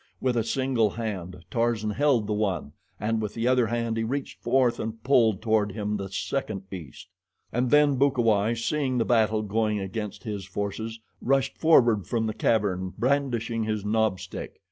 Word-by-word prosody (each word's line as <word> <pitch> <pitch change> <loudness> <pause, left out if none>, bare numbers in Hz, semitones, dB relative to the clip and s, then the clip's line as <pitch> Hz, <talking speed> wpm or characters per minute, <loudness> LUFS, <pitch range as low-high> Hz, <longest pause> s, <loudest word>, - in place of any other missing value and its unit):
With 130 -2 0
a 115 - +2
single 125 -2 +1
hand 95 -5 -5
Tarzan 115 -2 0
held 135 -3 +2
the 105 - -1
one, 105 -3 -1 0.3
and 110 +2 0
with 105 -1 -4
the 115 +1 0
other 125 -2 +3
hand 115 0 -1
he 115 - 0
reached 135 +4 -4
forth 130 -3 +2
and 110 0 -5
pulled 115 -7 +3
toward 110 -3 +1
him 105 -1 -2
the 100 -1 -5
second 95 -1 -3
beast. 85 -9 -9 0.4
And 125 +1 +1
then 145 -1 +5
Bukawai, 120 -5 +2
seeing 130 +2 -1
the 115 - +2
battle 110 -2 +2
going 105 +1 0
against 100 +1 -5
his 105 -4 -4
forces, 105 +4 -4 0.2
rushed 135 +1 +1
forward 120 - +4
from 115 -2 0
the 110 - -1
cavern 95 -5 0
brandishing 120 -3 0
his 110 -2 -2
knob 110 -3 +1
stick. - - -8
110 Hz, 170 wpm, -26 LUFS, 105-125 Hz, 0.4 s, then